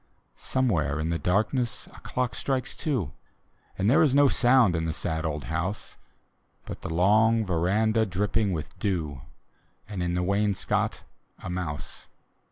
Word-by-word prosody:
Somewhere 80 - 0
in 80 +1 -1
the 85 - -1
darkness 110 +6 0
a - - -13
clock 125 -2 -2
strikes 130 -2 -2
two; 115 - -2 0.6
And 95 - +1
there 145 +8 +5
is 145 -4 +4
no 145 0 +6
sound 120 -7 +4
in 80 0 -1
the 80 - -1
sad 80 -1 -2
old 75 -2 -3
house, 80 - -3 0.7
But - - -7
the - - -5
long 110 +6 +4
veranda 105 +6 +2
dripping 100 +2 0
with 80 -4 -5
dew, 80 -9 -2 0.7
And 100 -3 -5
in 90 0 -1
the 90 - 0
wainscot 100 +1 0 0.3
a - - -7
mouse. 75 -6 -5
95 Hz, 150 wpm, -27 LUFS, 80-115 Hz, 0.7 s, no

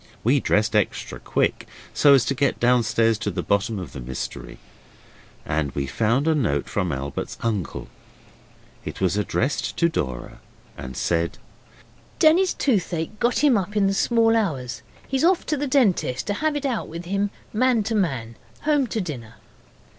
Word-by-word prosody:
We 130 +5 +4
dressed 110 -2 +1
extra 105 - -1
quick, - - -1 0.3
so 145 -2 +6
as 125 -4 +3
to - - 0
get 140 +1 0
downstairs 115 -2 +3
to 110 - -2
the 90 -2 -3
bottom 100 +2 0
of 90 -8 -7
the - - -7
mystery. 65 +1 -6 0.9
And 75 -2 -1
we 70 - -2
found 115 - +1
a 160 - +4
note 105 - 0
from 90 -4 -1
Albert's 70 0 -4
uncle. 105 -7 -2 1.0
It - - -6
was 95 -1 +1
addressed 120 +3 -1
to 170 - +3
Dora, 65 - -4 0.4
and 65 0 -8
said 85 -1 0 0.8
'Denny's 350 +4 +4
toothache 195 - -1
got 245 +4 +1
him 285 -5 +5
up 195 +2 -5
in 200 - +4
the 195 - +2
small 225 +2 +3
hours. 135 - -1 0.3
He's 265 +1 0
off 355 +1 +3
to 305 - 0
the 290 0 -2
dentist 205 - +2
to 205 - -1
have 305 +7 0
it 290 -1 -3
out 250 -5 -1
with 170 +2 -7
him, 200 +3 0 0.2
man 245 0 +3
to 220 +3 -2
man. 130 - -1 0.2
Home 290 -3 +2
to 225 -1 -2
dinner. 120 - -7
140 Hz, 170 wpm, -23 LUFS, -, 1.0 s, so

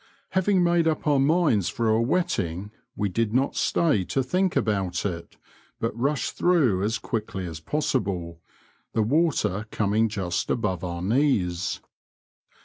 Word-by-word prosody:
Having 190 0 +2
made 170 -1 +3
up 160 - -1
our 145 -2 +3
minds 140 - +3
for 115 -1 -1
a 110 +1 +3
wetting, 105 - -1 0.2
we 105 - 0
did 110 +3 -1
not 135 +2 +1
stay 150 - +2
to 135 - 0
think 185 +7 0
about 95 -5 0
it, 85 -4 -5 0.4
but 115 -1 -2
rushed 140 +4 -1
through 140 - +3
as 110 +2 0
quickly 105 -4 -4
as 80 -2 -6
possible, 90 - -2 0.5
the 110 - +2
water 125 - +1
coming 110 +2 +1
just 95 -4 -2
above 95 -6 -1
our 85 -1 -4
knees. 95 -7 +1
110 Hz, 140 wpm, -25 LUFS, 95-145 Hz, 0.5 s, made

